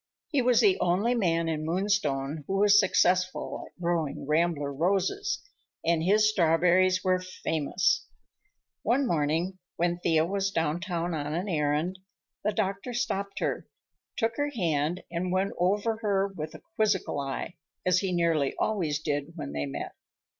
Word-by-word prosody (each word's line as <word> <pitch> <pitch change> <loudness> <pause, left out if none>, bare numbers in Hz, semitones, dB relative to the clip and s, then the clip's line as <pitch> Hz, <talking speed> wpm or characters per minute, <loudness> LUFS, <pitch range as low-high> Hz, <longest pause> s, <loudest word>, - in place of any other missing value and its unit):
He 285 -5 +2
was 245 -1 +4
the 390 -2 +4
only 190 +7 +2
man 170 -8 +1
in 155 -1 -2
Moonstone 160 -5 0
who 195 - -1
was 205 +1 +6
successful 185 -2 +1
at - - -23
growing 170 -6 -1
rambler 150 -2 +1
roses, 195 - 0 0.4
and 165 -1 +2
his 210 +5 +4
strawberries 185 0 +3
were 185 -1 +2
famous. 185 - -1 0.7
One 270 +3 +2
morning 170 +1 0 0.2
when 175 0 0
Thea 160 -2 +2
was 195 +2 -1
downtown 170 0 -1
on 150 0 -2
an 180 +4 -2
errand, 155 +2 0 0.4
the 210 - +1
doctor 210 +3 -2
stopped 200 -5 -2
her, - - -2 0.5
took 225 0 0
her 290 0 0
hand 170 - -1
and 175 +1 -2
went 190 +2 0
over 205 +5 +1
her 200 -3 +1
with 155 -5 -7
a - - -12
quizzical 210 -8 +1
eye, 140 +4 -4 0.3
as 185 0 +4
he 190 -1 -1
nearly 165 -5 +1
always 170 -9 0
did 145 0 -3
when 70 - -5
they 70 0 -3
met. 70 - -5
180 Hz, 150 wpm, -28 LUFS, 160-200 Hz, 0.7 s, was